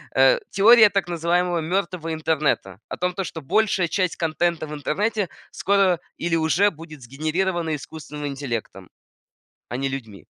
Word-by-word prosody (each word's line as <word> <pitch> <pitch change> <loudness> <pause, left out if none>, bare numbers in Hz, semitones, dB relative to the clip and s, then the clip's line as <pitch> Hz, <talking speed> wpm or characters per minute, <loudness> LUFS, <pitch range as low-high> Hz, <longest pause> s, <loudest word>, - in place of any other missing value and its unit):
э, - - +5
теория 220 +2 +7
так 195 -4 -1
называемого 175 +1 0
мертвого 170 -1 -2
интернета. 150 - -1
О - - -6
том, 180 0 -1
то 195 - -2
что 160 - -6
большая 190 +3 +1
часть 185 0 0
контента 165 0 0
в 150 - -7
интернете 200 +7 -1 0.2
скоро 195 -3 +2 0.2
или 170 0 0
уже 165 +6 +3
будет 155 -4 -12
сгенерирована 160 +6 -1
искусственным 150 0 -7
интеллектом, 120 -9 -5 0.8
а 120 - -3
не 135 +1 -1
людьми. 110 - -7
165 Hz, 145 wpm, -23 LUFS, 150-185 Hz, 0.8 s, теория